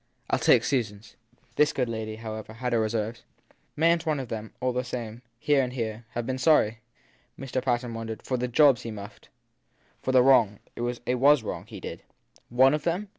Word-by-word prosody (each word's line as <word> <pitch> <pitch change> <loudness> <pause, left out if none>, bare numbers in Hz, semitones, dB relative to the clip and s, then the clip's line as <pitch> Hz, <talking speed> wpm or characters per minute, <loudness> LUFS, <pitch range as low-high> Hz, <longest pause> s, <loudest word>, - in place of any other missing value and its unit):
I - - +3
ll - - -6
take - - +5
Susan 115 -7 0
s! 105 +1 -18 0.4
This 150 -1 +4
good 125 -2 0
lady, 110 -1 -4
however, 110 -1 -7
had 125 +2 -3
her 115 - +3
reserves. 110 +1 -2 0.5
Mayn 165 +2 +3
t - - -11
one 155 -3 0
of 130 -3 -6
them, 110 -1 -5
all 125 0 0
the 125 +1 -1
same 120 -2 -6 0.2
here 140 +3 +2
and 125 -1 -3
there 115 -2 -4
have 120 -1 -2
been 130 +1 -3
sorry? 115 -7 +3 0.6
Mr. 130 -1 -3
Patten 120 -2 -1
wondered. 115 -1 -6
For 130 - -2
the 125 +1 -1
jobs 135 -1 +5
he 115 - -6
muffed? 105 -2 -10 0.7
For 130 - -1
the 130 -1 +6
wrong 115 -6 +5 0.2
as 120 0 -3
it 125 0 0
was 140 -1 +5
wrong - - -5
he - - -9
did. - - -7 0.5
"One" 130 +3 +5
of 150 - 0
them? 175 +6 -2
120 Hz, 210 wpm, -27 LUFS, 110-135 Hz, 0.7 s, the